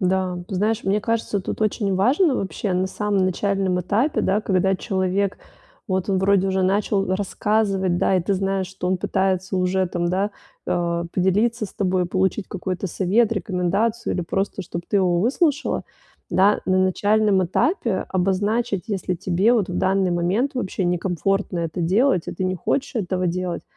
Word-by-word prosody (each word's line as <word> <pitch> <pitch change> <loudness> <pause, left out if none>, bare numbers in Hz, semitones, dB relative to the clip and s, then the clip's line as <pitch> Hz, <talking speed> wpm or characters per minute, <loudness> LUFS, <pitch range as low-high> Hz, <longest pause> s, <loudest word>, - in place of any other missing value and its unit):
Да, 185 -1 0
ты 195 - -6
знаешь, 210 +3 0
мне 200 +2 +1
кажется, 220 -2 -1
тут 190 - -5
очень 210 -2 0
важно 265 - +3
вообще 190 +1 -3
на 185 +1 +1
самом 200 -1 0
начальном 190 -1 0
этапе, 220 - +1
да, 205 +3 +1
когда 190 -1 +1
человек, 190 0 -1 0.5
вот 190 +1 -1
он 190 -1 +2
вроде 195 0 +3
уже 190 0 +1
начал 195 0 +1
рассказывать, 195 -2 0
да, 190 - +2
и 180 - +1
ты 195 +2 0
знаешь, 195 -1 -1
что 190 -1 -5
он 185 0 +1
пытается 190 0 -1
уже 185 +1 +1
там, 175 -1 -2
да, 195 +3 0 0.4
э, 170 -1 0
поделиться 210 +5 +1
с - - -17
тобой, 185 -2 0
получить 190 +2 0
какой-то 185 0 -4
совет, 205 +6 +1
рекомендацию, 200 +4 -1
или 180 - -1
просто, 195 +3 -2
чтоб 170 0 -6
ты 205 - +2
его 175 -2 +2
выслушала, 290 - +1 0.5
да. 200 +3 +3
На 185 0 +2
начальном 205 +1 +2
этапе 225 - 0
обозначить, 195 +2 0
если 190 -3 -2
тебе 190 +6 +2
вот 205 -6 +1
в - - -4
данный 190 -1 +2
момент 180 +10 +1
вообще 190 -6 -2
некомфортно 180 +1 -1
это 165 +1 -3
делать, 190 +3 +2
и - - -3
ты 185 - -3
не 185 0 0
хочешь 255 - -2
этого 185 -3 -1
делать. 180 0 -2
190 Hz, 170 wpm, -22 LUFS, 185-205 Hz, 0.5 s, важно